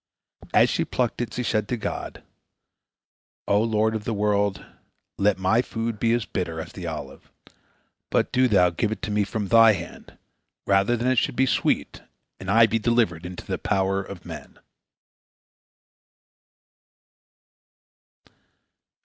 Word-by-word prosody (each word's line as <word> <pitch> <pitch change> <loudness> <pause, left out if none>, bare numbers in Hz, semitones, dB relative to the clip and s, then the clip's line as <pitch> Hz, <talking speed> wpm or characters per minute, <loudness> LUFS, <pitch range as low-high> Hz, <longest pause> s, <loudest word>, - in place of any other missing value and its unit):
As - - +5
she - - 0
plucked 125 -1 -2
it, 120 - -3
she 125 - -2
said 110 -3 0
to 125 - -2
God: 110 - -5 1.2
"O 100 +1 +3
Lord 110 -1 +1
of 110 -1 -3
the 115 0 -2
world, 100 -1 0 0.5
let 100 0 +3
my 95 +5 +2
food 115 -3 -4
be 115 - +2
as 120 -1 0
bitter 85 -6 -4
as 80 - -7
the - - -7
olive, - - -8 0.8
but - - +1
do 130 0 +3
Thou 90 -6 +4
give 105 +6 -1
it 110 - -5
to 105 - -3
me 105 0 +2
from 105 +1 -3
Thy 115 -1 +7
hand, 85 -3 -9 0.5
rather 100 +5 +2
than 120 +2 -2
it 130 -2 +3
should - - -2
be 135 - +3
sweet, 130 - 0 0.4
and 95 - -7
I 115 +3 +6
be 115 0 0
delivered 105 -8 +1
into 90 0 -9
the - - -3
power 95 -1 0
of 95 -2 -10
men." - - -10
105 Hz, 150 wpm, -24 LUFS, 95-115 Hz, 1.2 s, Thy